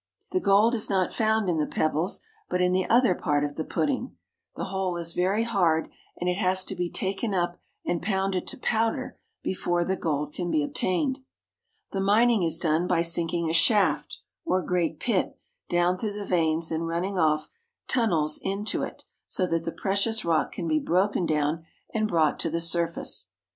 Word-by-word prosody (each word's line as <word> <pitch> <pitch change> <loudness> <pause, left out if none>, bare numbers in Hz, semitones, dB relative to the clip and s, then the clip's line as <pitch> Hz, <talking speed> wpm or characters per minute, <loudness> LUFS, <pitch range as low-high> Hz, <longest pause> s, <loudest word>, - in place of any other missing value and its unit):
The 370 - +2
gold 215 - +4
is 225 -3 0
not 190 -2 +1
found 220 -2 +1
in 170 -3 +1
the 150 - 0
pebbles, 160 +5 -1 0.3
but 180 - 0
in 180 0 +3
the 185 0 0
other 240 -4 +5
part 145 -4 0
of 145 0 -2
the 160 - -2
pudding. 260 - -2 0.4
The - - -4
whole 190 -2 -2
is 170 -1 -2
very 190 +5 +1
hard 175 -8 +1 0.3
and 180 - -3
it 180 0 +1
has 185 -2 +2
to 195 - -3
be 175 -1 -2
taken 195 +3 -1
up 175 -1 -1 0.3
and 175 -1 -1
pounded 195 -2 -1
to - - -4
powder 225 -2 -1 0.2
before 175 -2 0
the 190 - 0
gold 150 -4 -2
can 175 -1 -3
be 155 -3 +2
obtained. 260 - 0 0.7
The 195 - -2
mining 220 +3 +4
is 165 -2 +2
done 165 +1 +1
by 170 -1 +2
sinking 170 0 0
a 160 - -1
shaft, 165 -4 +3 0.3
or 185 0 +1
great 170 -3 -1
pit, 220 -6 0 0.3
down 175 +1 +2
through 210 -2 -2
the 205 0 -5
veins 165 -2 +1
and 165 +1 -1
running 180 +3 -2
off 155 -1 +1 0.4
tunnels 165 - +1
into 200 +2 -1
it - - -6 0.2
so 185 - +1
that 165 -2 -1
the 165 - -2
precious 200 +4 0
rock 165 -2 +1
can 170 - -4
be 155 -1 +2
broken 180 +2 +1
down 155 +1 0 0.3
and 215 -1 +1
brought 160 -6 +2
to 165 - 0
the 165 +1 -1
surface. 170 0 0
180 Hz, 185 wpm, -26 LUFS, 165-200 Hz, 0.7 s, other